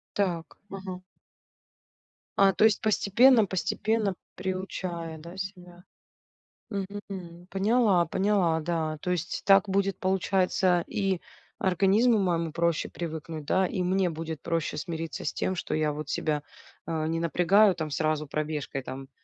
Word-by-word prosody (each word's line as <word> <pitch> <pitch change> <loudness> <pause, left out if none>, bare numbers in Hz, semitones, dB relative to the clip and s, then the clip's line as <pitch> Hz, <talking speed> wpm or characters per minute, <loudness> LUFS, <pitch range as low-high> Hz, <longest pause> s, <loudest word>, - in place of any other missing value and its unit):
Так, 175 -5 -2
ага. 190 -2 -6 1.4
А, 195 -1 +6
то 210 - +2
есть 220 -3 +4
постепенно, 220 +2 +5
постепенно 205 +2 0 0.2
приучая, 185 -3 -4
да, 170 +4 -10
себя. 180 -2 -8 0.9
Мгм, 200 -1 -4
мм, 175 -2 -8
поняла, 200 -2 +3
поняла, 185 -3 +1
да. 160 -2 -2
То 180 - -1
есть 175 0 -2
так 195 0 +5
будет, 195 0 0
получается, 185 -1 +2
и 195 -3 -1 0.4
организму 200 +6 +3
моему 170 -4 0
проще 170 0 0
привыкнуть, 160 -2 -6
да, 185 +5 +2
и 180 - -2
мне 185 0 +2
будет 160 -1 -5
проще 165 -2 -2
смириться 165 +1 -5
с - - -1
тем, 185 - -1
что - - -3
я 155 -1 +1
вот 150 +1 -6
себя, 150 -2 -1 0.5
а, 160 -1 -1
не 165 0 -1
напрягаю 180 +4 +4
там 160 -2 -4
сразу 155 0 0
пробежкой 150 -2 -3
там, 135 +1 -8
180 Hz, 135 wpm, -28 LUFS, 165-195 Hz, 1.4 s, А